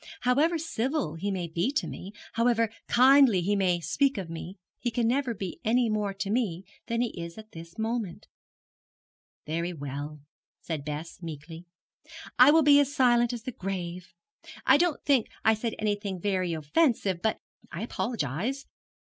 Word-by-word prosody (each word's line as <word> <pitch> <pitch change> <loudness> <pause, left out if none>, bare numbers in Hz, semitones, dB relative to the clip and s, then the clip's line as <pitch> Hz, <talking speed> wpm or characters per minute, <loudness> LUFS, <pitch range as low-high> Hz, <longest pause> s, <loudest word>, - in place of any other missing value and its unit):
However 290 +8 +3
civil 270 - -2
he 165 +5 -3
may 185 -3 -2
be 170 +9 -1
to 300 - 0
me, 190 - -7 0.2
however 230 -1 +2 0.2
kindly 260 -4 +6
he 200 +4 +1
may 185 -3 +2
speak 275 - +1
of 180 -4 -5
me, 175 +3 -7 0.2
he 245 - -1
can 230 0 0
never 250 -1 0
be 190 -3 -6
any 235 +1 +2
more 210 -2 0
to 195 +1 -4
me 205 -7 0 0.2
than 230 0 0
he 245 - +1
is 170 +2 -8
at 215 0 -11
this 165 0 -11
moment.' 220 -4 -3 1.2
'Very 170 +3 -2
well,' 145 0 -6 0.4
said 155 -4 -4
Bess, 150 +4 -6
meekly, 165 +1 -8 0.7
'I 250 +3 +9
will 320 +1 +6
be 285 0 +7
as 285 -1 +2
silent 240 -4 +3
as 240 -2 -6
the 255 - -4
grave. 180 -4 -5 0.6
I - - +7
don't 345 -1 0
think 270 -6 +3 0.2
I 220 - +6
said 220 +1 -3
anything 205 -3 -2
very 185 -2 0
offensive, 190 - +1
but 220 - +1 0.3
I 170 +5 -5
apologize. 230 - -2
210 Hz, 165 wpm, -28 LUFS, 170-245 Hz, 1.2 s, I